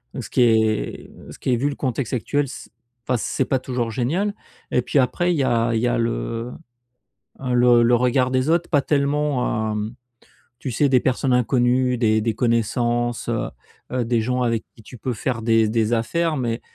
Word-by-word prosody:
heu, - - -3
ce - - -9
qui - - +2
est 110 -2 +1 0.2
ce - - -11
qui 130 - 0
est - - +2
vu 140 +4 0
le 140 - -5
contexte 130 -2 -3
actuel, 140 +4 0
c 115 - -10 0.4
enfin, 125 -1 +1
c'est - - -1
pas 130 - 0
toujours 125 -3 -3
génial. 170 - -1 0.4
Et 125 - +2
puis 135 - -1
après, 175 +8 +1
il - - -1
y 135 - +1
a 115 -2 +1
il - - +2
y 125 - +1
a 120 - +1
le 115 +1 -2 0.9
le 125 -2 +4
le 120 +1 +4
regard 125 +1 +2
des 130 +2 0
autres. 170 +1 +1
Pas 145 -4 +3
tellement, 140 -6 0
hem, 105 +2 -3 0.7
tu 130 - -4
sais, 145 +5 +2
des 130 -2 +4
personnes 130 0 +1
inconnues, 125 0 +2
des 110 -2 +2
des 115 -1 -1
connaissances, 120 0 0
heu - - -1 0.4
heu, 125 -2 -1
des 115 -1 +1
gens 125 +2 -1
avec 115 -2 0
qui - - -14
tu 125 - -12
peux 125 +3 -3
faire 120 +2 -3
des 115 -1 +3
des 110 0 +1
affaires, 155 +8 0
mais 115 -2 -2
125 Hz, 200 wpm, -22 LUFS, 115-130 Hz, 0.9 s, le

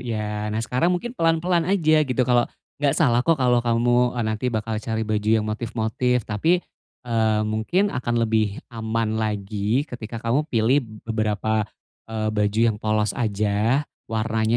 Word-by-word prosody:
iya 105 -3 -3
nah 105 - -3
sekarang 130 +8 +1
mungkin 180 +7 -1
pelan-pelan 165 -1 +1
aja 155 -5 +3
gitu 125 0 +1
kalau 120 -1 +2 0.3
gak 145 -2 +2
salah 125 -7 +3
kok 165 +5 +2
kalau 125 -3 +3
kamu 120 +1 +2
oh 120 - 0
nanti 110 +3 -1
bakal 110 -1 -2
cari 110 0 -2
baju 105 0 -1
yang 110 -1 +3
motif-motif 115 +2 -1
tapi, 160 - +1 0.4
eee, 110 -2 +1
mungkin 110 - 0
akan 120 -2 -2
lebih 110 -2 +1 0.2
aman 110 -1 -1
lagi 105 +4 -1
ketika 115 -2 -7
kamu 125 +6 +1
pilih 115 +4 +3 0.3
beberapa, 110 -1 0 0.4
eee, 110 -1 -2
baju 105 +1 +1
yang 105 - -1
polos 110 0 +1
aja 110 +3 +1 0.2
warnanya 110 +1 0
115 Hz, 150 wpm, -23 LUFS, 110-125 Hz, 0.4 s, aja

